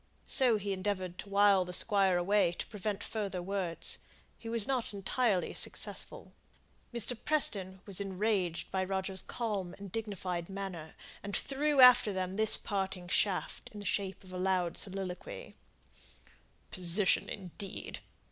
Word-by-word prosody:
So 245 Hz, -4 st, +4 dB
he 200 Hz, -1 st, -3 dB
endeavoured 185 Hz, -2 st, -3 dB
to 200 Hz, -, -8 dB
wile 200 Hz, -1 st, +4 dB
the 180 Hz, 0 st, -8 dB
Squire 195 Hz, -2 st, +3 dB
away 185 Hz, 0 st, +2 dB
to -, -, -5 dB
prevent 210 Hz, -1 st, -4 dB
further 200 Hz, -4 st, -4 dB
words. 180 Hz, -2 st, -1 dB, 0.4 s
He 230 Hz, -, -8 dB
was 230 Hz, -2 st, +2 dB
not 255 Hz, -6 st, -2 dB
entirely 200 Hz, -1 st, 0 dB
successful. -, -, -2 dB, 0.6 s
Mr. 240 Hz, +1 st, 0 dB
Preston 195 Hz, -11 st, +3 dB
was 200 Hz, -1 st, -3 dB
enraged 190 Hz, -3 st, -2 dB
by 190 Hz, -1 st, 0 dB
Roger's 190 Hz, 0 st, -2 dB
calm 205 Hz, -7 st, -4 dB
and 200 Hz, -2 st, -10 dB
dignified 190 Hz, -5 st, -4 dB
manner, 190 Hz, -5 st, -7 dB, 0.3 s
and 200 Hz, 0 st, -2 dB
threw 285 Hz, +1 st, +1 dB
after 250 Hz, -4 st, +8 dB
them 185 Hz, 0 st, -3 dB
this 220 Hz, +1 st, +7 dB
parting 190 Hz, -3 st, -4 dB
shaft, 185 Hz, +1 st, 0 dB
in 210 Hz, -, -8 dB
the 205 Hz, -, -8 dB
shape 195 Hz, 0 st, -2 dB
of 185 Hz, -1 st, -13 dB
a 180 Hz, -, -5 dB
loud 185 Hz, -2 st, 0 dB
soliloquy, 195 Hz, -, -5 dB, 1.2 s
"Position, 185 Hz, +2 st, +2 dB
indeed! 195 Hz, 0 st, -5 dB
195 Hz, 140 wpm, -32 LUFS, 185-210 Hz, 1.2 s, after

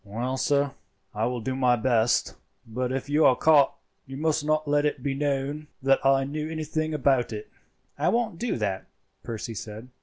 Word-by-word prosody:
"Well, 120 Hz, +6 st, -3 dB
sir, 140 Hz, +1 st, +1 dB, 0.4 s
I 110 Hz, +1 st, 0 dB
will 125 Hz, 0 st, -2 dB
do 130 Hz, +4 st, -2 dB
my 125 Hz, -2 st, +3 dB
best; 120 Hz, -1 st, +2 dB, 0.3 s
but 125 Hz, +3 st, -3 dB
if 135 Hz, +1 st, -3 dB
you 150 Hz, +2 st, +3 dB
are 130 Hz, -, +6 dB
caught 150 Hz, -2 st, +4 dB, 0.3 s
you 135 Hz, 0 st, -7 dB
must 155 Hz, 0 st, 0 dB
not 155 Hz, 0 st, 0 dB
let 145 Hz, 0 st, +2 dB
it 150 Hz, -3 st, -1 dB
be 140 Hz, -, 0 dB
known 145 Hz, +1 st, -2 dB, 0.2 s
that 135 Hz, 0 st, +3 dB
I 135 Hz, 0 st, +4 dB
knew 150 Hz, +3 st, -4 dB
anything 155 Hz, 0 st, -2 dB
about 135 Hz, -4 st, +2 dB
it." 105 Hz, -1 st, -7 dB, 0.5 s
"I -, -, +2 dB
won't 225 Hz, -7 st, 0 dB
do 240 Hz, -, -1 dB
that," 100 Hz, -4 st, -2 dB, 0.3 s
Percy 115 Hz, 0 st, -5 dB
said. 110 Hz, +3 st, -8 dB
135 Hz, 185 wpm, -26 LUFS, 120-150 Hz, 0.5 s, are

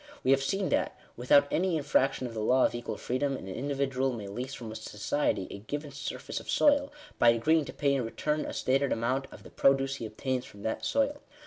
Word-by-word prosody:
We 130 Hz, -, +3 dB
have 135 Hz, 0 st, +4 dB
seen 195 Hz, +7 st, 0 dB
that, -, -, 0 dB, 0.2 s
without 140 Hz, +4 st, +4 dB
any 180 Hz, -1 st, +1 dB
infraction 135 Hz, -3 st, +1 dB
of 120 Hz, -, -5 dB
the 110 Hz, -, -4 dB
law 125 Hz, +4 st, +4 dB
of -, -, 0 dB
equal 120 Hz, 0 st, -4 dB
freedom, 135 Hz, +2 st, -1 dB
an 95 Hz, -, -9 dB
individual 135 Hz, +4 st, -1 dB
may 105 Hz, -4 st, -6 dB
lease 125 Hz, +7 st, -5 dB
from 115 Hz, -3 st, -7 dB
society 105 Hz, -1 st, -1 dB
a -, -, -7 dB
given 145 Hz, +7 st, -5 dB
surface 145 Hz, +2 st, -5 dB
of -, -, -12 dB
soil, 285 Hz, -1 st, +3 dB, 0.3 s
by 120 Hz, -, +7 dB
agreeing 150 Hz, +7 st, +3 dB
to -, -, -7 dB
pay 140 Hz, -1 st, +1 dB
in 135 Hz, -2 st, +1 dB
return 150 Hz, +6 st, -1 dB
a -, -, -5 dB
stated 135 Hz, +1 st, +1 dB
amount 130 Hz, +4 st, 0 dB
of -, -, -12 dB
the -, -, -13 dB
produce 135 Hz, 0 st, +2 dB
he 115 Hz, -, -5 dB
obtains 125 Hz, +4 st, -2 dB
from 100 Hz, 0 st, -13 dB
that 110 Hz, -, -2 dB
soil. 280 Hz, +1 st, 0 dB
135 Hz, 215 wpm, -29 LUFS, 115-145 Hz, 0.3 s, by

